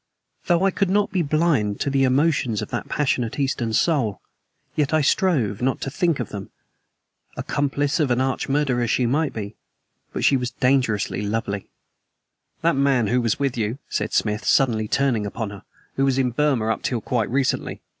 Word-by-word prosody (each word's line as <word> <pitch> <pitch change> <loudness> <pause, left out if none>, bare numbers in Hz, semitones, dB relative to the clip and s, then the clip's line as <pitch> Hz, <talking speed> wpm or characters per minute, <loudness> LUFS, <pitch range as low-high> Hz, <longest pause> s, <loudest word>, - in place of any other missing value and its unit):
Though 175 0 +3
I 195 - +3
could 195 0 0
not 205 +1 +2
be 185 -2 +1
blind 150 -9 +1
to 140 - 0
the 135 -1 +3
emotions 130 -4 +1
of - - -9
that - - -4
passionate 125 -5 0
Eastern 130 -4 -1
soul, 115 - +1 0.6
yet 150 0 +1
I 155 - +3
strove 135 - +1
not 130 +1 0
to 135 - -3
think 170 -1 0
of 125 - -3
them. 100 -2 -7 0.9
Accomplice 145 +2 -1
of 150 -4 +2
an 120 0 +2
arch 130 +1 -1
murderer 135 -4 +1
she 125 +2 +1
might 145 +5 +1
be; 105 -1 -6 0.6
but - - -2
she 135 - +5
was 125 -1 -2
dangerously 125 -7 +1
lovely. 105 -1 -3 0.9
"That 170 -1 +3
man 135 -4 +2
who 125 +1 +2
was 115 -3 0
with 140 -3 0
you," 115 +1 -2
said - - -2
Smith, 105 -1 0
suddenly 115 -5 +2
turning 120 -5 +1
upon 110 0 -4
her, 100 -2 -10 0.4
"was 135 -1 +2
in 130 -2 +1
Burma 130 -4 +1
up 110 - -1
till 120 - -1
quite 115 0 -1
recently. 135 +1 -1
130 Hz, 180 wpm, -23 LUFS, 115-145 Hz, 0.9 s, she